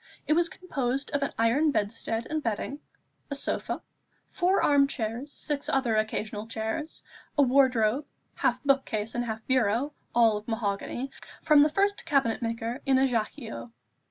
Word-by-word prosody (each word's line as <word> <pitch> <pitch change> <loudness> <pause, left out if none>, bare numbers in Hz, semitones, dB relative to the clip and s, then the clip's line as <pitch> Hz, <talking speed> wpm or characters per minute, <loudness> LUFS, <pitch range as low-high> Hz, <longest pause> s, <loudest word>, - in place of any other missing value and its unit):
It - - +3
was 340 +1 +3
composed 275 -6 -3
of 285 - 0
an 280 - 0
iron 235 +8 +3
bedstead 225 -1 -1
and 310 0 -2
bedding, 235 +4 -3 0.5
a 280 - -2
sofa, 280 - -2 0.5
four 370 +2 +2
arm 280 -1 +5
chairs, 240 +2 -4
six 290 -1 -2
other 250 -5 +1
occasional 215 0 -2
chairs, 225 +8 -4 0.3
a 285 - +6
wardrobe, 255 -1 +3 0.3
half - - 0
book 275 -1 +3
case 215 0 -3
and 240 - -1
half 220 -1 -5
bureau, 255 +2 +1 0.2
all 225 -3 +5
of 210 - -9
mahogany, 225 +4 -2 0.3
from 300 -2 +6
the 300 - +5
first 400 +6 +1
cabinet 275 -8 +1
maker 230 +2 -3
in 270 -2 +3
Ajaccio. 225 - -1
250 Hz, 155 wpm, -28 LUFS, 225-285 Hz, 0.5 s, a